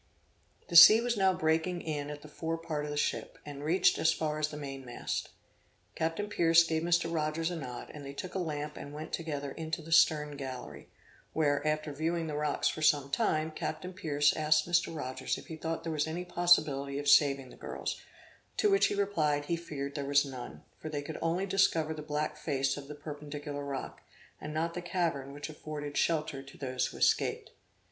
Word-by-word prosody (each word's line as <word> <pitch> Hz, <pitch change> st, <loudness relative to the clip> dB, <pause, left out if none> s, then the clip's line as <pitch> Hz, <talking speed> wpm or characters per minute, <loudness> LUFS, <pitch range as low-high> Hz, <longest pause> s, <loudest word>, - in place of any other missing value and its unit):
The 170 Hz, -, -4 dB
sea 175 Hz, +7 st, +11 dB
was 240 Hz, 0 st, 0 dB
now 190 Hz, -2 st, +4 dB
breaking 170 Hz, 0 st, 0 dB
in 145 Hz, -2 st, -3 dB
at 150 Hz, 0 st, -7 dB
the -, -, -10 dB
fore 165 Hz, +2 st, -3 dB
part 160 Hz, -3 st, -3 dB
of -, -, -5 dB
the 145 Hz, -, -4 dB
ship, -, -, -1 dB
and 145 Hz, -1 st, -7 dB
reached 175 Hz, +4 st, +3 dB
as 160 Hz, -, +4 dB
far 155 Hz, -2 st, -2 dB
as 150 Hz, -, +1 dB
the 150 Hz, -, -8 dB
mainmast. 135 Hz, -4 st, -5 dB, 0.6 s
Captain 165 Hz, +6 st, -2 dB
Pierce 170 Hz, -4 st, +5 dB
gave 160 Hz, -1 st, -1 dB
Mr. 170 Hz, 0 st, +1 dB
Rogers 160 Hz, +1 st, -1 dB
a -, -, -3 dB
nod, 125 Hz, -6 st, -7 dB
and 150 Hz, -, -9 dB
they 140 Hz, -, -6 dB
took 175 Hz, +6 st, -7 dB
a 190 Hz, -, -1 dB
lamp 150 Hz, -3 st, -4 dB
and 145 Hz, +1 st, -8 dB
went 155 Hz, +1 st, -7 dB
together 145 Hz, -4 st, -3 dB
into 160 Hz, +2 st, -4 dB
the 165 Hz, -, -10 dB
stern 150 Hz, -3 st, +4 dB
gallery, 130 Hz, -3 st, -7 dB, 0.4 s
where, 145 Hz, -3 st, +1 dB
after 155 Hz, -1 st, -1 dB
viewing 165 Hz, +3 st, -1 dB
the 155 Hz, -2 st, -4 dB
rocks 150 Hz, 0 st, 0 dB
for 155 Hz, -, -2 dB
some 145 Hz, -2 st, +3 dB
time, 155 Hz, +3 st, +1 dB
Captain 180 Hz, +3 st, -4 dB
Pierce 145 Hz, -4 st, +2 dB
asked 155 Hz, 0 st, +3 dB
Mr. 170 Hz, -1 st, +1 dB
Rogers 130 Hz, -3 st, -3 dB
if -, -, -10 dB
he 160 Hz, -, -7 dB
thought 160 Hz, +1 st, -4 dB
there 165 Hz, -1 st, -3 dB
was 150 Hz, 0 st, 0 dB
any 170 Hz, +3 st, -4 dB
possibility 155 Hz, -6 st, +3 dB
of 145 Hz, 0 st, -4 dB
saving 140 Hz, -2 st, +4 dB
the -, -, -13 dB
girls; -, -, -5 dB, 0.6 s
to 420 Hz, -, +3 dB
which 395 Hz, -, +5 dB
he -, -, -2 dB
replied, 155 Hz, -8 st, +1 dB
he 170 Hz, -, 0 dB
feared 145 Hz, -4 st, -5 dB
there 145 Hz, -, -3 dB
was 140 Hz, +1 st, +3 dB
none; 130 Hz, -3 st, -8 dB, 0.2 s
for 155 Hz, -, -6 dB
they 145 Hz, -2 st, -3 dB
could 155 Hz, +1 st, -6 dB
only 170 Hz, +4 st, 0 dB
discover 175 Hz, -5 st, +2 dB
the 155 Hz, -, -7 dB
black 150 Hz, 0 st, -2 dB
face 135 Hz, -3 st, 0 dB
of 140 Hz, -1 st, -8 dB
the 150 Hz, -, -7 dB
perpendicular 145 Hz, -1 st, -6 dB
rock, 140 Hz, -2 st, -5 dB, 0.4 s
and 150 Hz, -, -5 dB
not 165 Hz, +2 st, -1 dB
the 180 Hz, -, -4 dB
cavern 165 Hz, -6 st, -1 dB
which 145 Hz, +1 st, -6 dB
afforded 150 Hz, -1 st, -6 dB
shelter 155 Hz, -4 st, 0 dB
to 135 Hz, 0 st, -14 dB
those 130 Hz, -2 st, -1 dB
who -, -, -9 dB
escaped. -, -, +1 dB
155 Hz, 205 wpm, -31 LUFS, 145-165 Hz, 0.6 s, sea